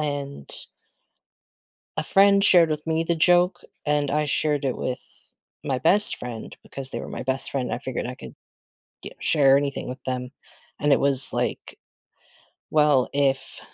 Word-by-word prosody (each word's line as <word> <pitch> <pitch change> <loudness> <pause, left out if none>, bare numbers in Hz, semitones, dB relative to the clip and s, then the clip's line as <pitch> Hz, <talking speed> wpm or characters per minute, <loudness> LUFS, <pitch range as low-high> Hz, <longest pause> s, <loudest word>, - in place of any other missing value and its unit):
and 140 - -4 1.5
a - - 0
friend 200 +4 +4
shared 175 -5 +6
with 150 0 -3
me 160 +1 0
the 170 - 0
joke, 175 +2 +3 0.3
and 145 -1 +1
I 150 +1 +1
shared 150 0 0
it 130 -2 -1
with 125 - -7 0.3
my 135 -3 -1
best 200 +11 +3
friend- 120 -2 -8
because 135 -1 -6
they - - -3
were - - -8
my - - -6
best 130 +1 0
friend 130 -3 -2
I - - -1
figured 130 -2 -4
I 125 - -6
could - - -11 0.7
ge - - -5
share 140 -3 +4
anything 140 -2 -3
with 130 - -8
them- 125 0 -4 0.5
and 145 0 +3
it - - +3
was 140 -1 +2
like, - - -3 0.9
"Well, 150 -4 +3
if, 135 -1 -1
140 Hz, 160 wpm, -24 LUFS, 130-155 Hz, 1.5 s, shared